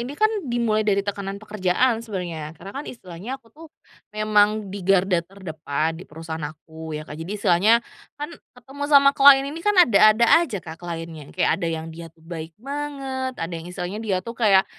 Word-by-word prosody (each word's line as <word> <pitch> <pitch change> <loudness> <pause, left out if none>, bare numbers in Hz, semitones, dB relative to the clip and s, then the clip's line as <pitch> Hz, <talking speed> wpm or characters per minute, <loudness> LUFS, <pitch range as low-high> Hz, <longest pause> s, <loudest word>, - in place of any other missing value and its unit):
ini 245 +3 -4
kan 435 +5 +3 0.2
dimulai 235 -3 +1
dari 200 -2 +1
tekanan 200 -1 -4
pekerjaan 215 +3 0
sebenarnya, 175 -8 -5
karena 195 +5 -10
kan 280 +2 -5
istilahnya 200 +2 -7
aku 230 -5 -26
tuh 325 +2 -13 0.5
memang 210 -1 +2
di 200 - -5
garda 185 -1 +3
terdepan 160 -4 -3
di - - -12
perusahaan 160 +1 -7
aku 160 +1 -7
ya 155 - -6
Kak. 150 -1 -9
Jadi 165 +3 -6
istilahnya 205 +4 +3 0.3
kan 295 +3 -6 0.2
ketemu 270 +3 -7
sama 280 -1 +7
client 275 -1 +7
ini 295 +4 -6
kan, 415 +3 +1
ada-ada 220 - +6 0.2
aja 300 -12 -2
Kak, 160 -2 -10
client-nya, 165 -3 -7
kayak 185 - +2
ada 170 - -1
yang 160 0 -4
dia 165 +1 -9
tu 160 0 -25
baik 165 -1 -7
banget, 270 0 -4
ada 165 +1 -4
yang, 165 +1 -6
istilahnya 180 +3 -5
dia 210 -4 0
tuh 230 - -5
kayak 210 -5 +4
200 Hz, 185 wpm, -23 LUFS, 165-240 Hz, 0.5 s, sama